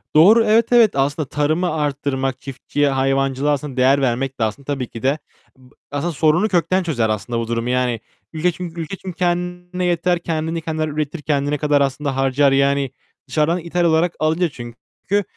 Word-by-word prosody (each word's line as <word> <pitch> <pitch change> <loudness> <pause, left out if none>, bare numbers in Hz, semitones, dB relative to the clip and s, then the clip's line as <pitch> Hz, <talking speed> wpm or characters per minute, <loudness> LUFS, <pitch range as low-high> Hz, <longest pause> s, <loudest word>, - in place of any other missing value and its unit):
Doğru. 205 +9 +7
Evet, 225 +2 +3
evet. 235 -4 +5
Aslında 140 +1 0
tarımı 155 +5 0
artırmak, 140 -3 -2
çiftçiye, 140 +2 -1
hayvancılığa, 135 +1 +1
aslında, 140 -2 -5
değer 135 +2 +4
vermek 130 +1 -1
de - - +1
aslında 110 +6 -3
tabii 135 -3 -3
ki 115 - -10
de 135 +3 +2 0.4
ıb 130 0 -20 0.2
aslında 145 +4 -2
sorunu 160 +7 +3
kökten 185 -1 +1
çözer, 120 -10 0
aslında, 110 +3 -2
bu 115 - -3
durumu. 115 +1 -2
Yani, 125 -2 0 0.3
üle 165 +3 +1
çünkü 170 -1 -6
ülke 160 +4 -5
çünkü 185 -2 -8
kendine 180 0 -2
yeter, 175 0 +1
kendini 165 0 -2
kendiler 155 -1 -2
üretir, 150 +1 -3
kendine 145 0 0
kadar 145 -1 +2
aslında 140 0 -1
harcar. 135 +1 +2
Yani, 140 -1 +2 0.4
dışarıdan 155 +6 +1
ithal 175 +1 -1
olarak 165 +1 +2
alınca 160 +3 +1
çünkü 125 - -4
150 Hz, 170 wpm, -20 LUFS, 135-170 Hz, 0.4 s, Doğru